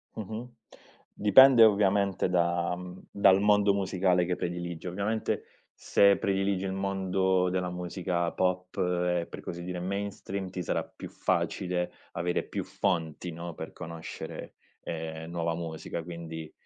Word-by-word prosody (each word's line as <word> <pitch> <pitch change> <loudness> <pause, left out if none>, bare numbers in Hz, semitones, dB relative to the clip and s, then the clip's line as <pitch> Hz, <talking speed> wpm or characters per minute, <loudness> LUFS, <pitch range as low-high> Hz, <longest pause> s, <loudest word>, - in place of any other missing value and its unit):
Mh-mh. 110 +3 -6 0.6
Dipende 120 +4 +8
ovviamente 100 -3 +3
da, 85 -1 +1
mhmm, 90 0 -9
dal 95 -1 +5
mondo 105 -1 +4
musicale 95 -2 +2
che 90 0 0
prediligi. 85 0 -4
Ovviamente 100 +5 -1 0.3
se 100 -1 +4
prediligi 95 -1 0
il 95 - -2
mondo 95 -1 +1
della 90 0 -1
musica 90 -1 -2
pop 90 0 -1
e, 90 -1 +1
per - - -9
così 85 0 -6
dire, 90 0 -4
mainstream 100 0 -4
ti 90 0 -5
sarà - - -1
più - - -10
facile 90 -1 -1 0.2
avere 90 +1 -1
più - - -4
fonti, 85 -2 -2
no, 85 +1 -6
per - - -7
conoscere, 80 0 -8 0.3
ehm, 80 -1 -5
nuova 85 -1 -1
musica 80 0 -5
quindi, 80 -2 -7
90 Hz, 135 wpm, -29 LUFS, 85-100 Hz, 0.6 s, Dipende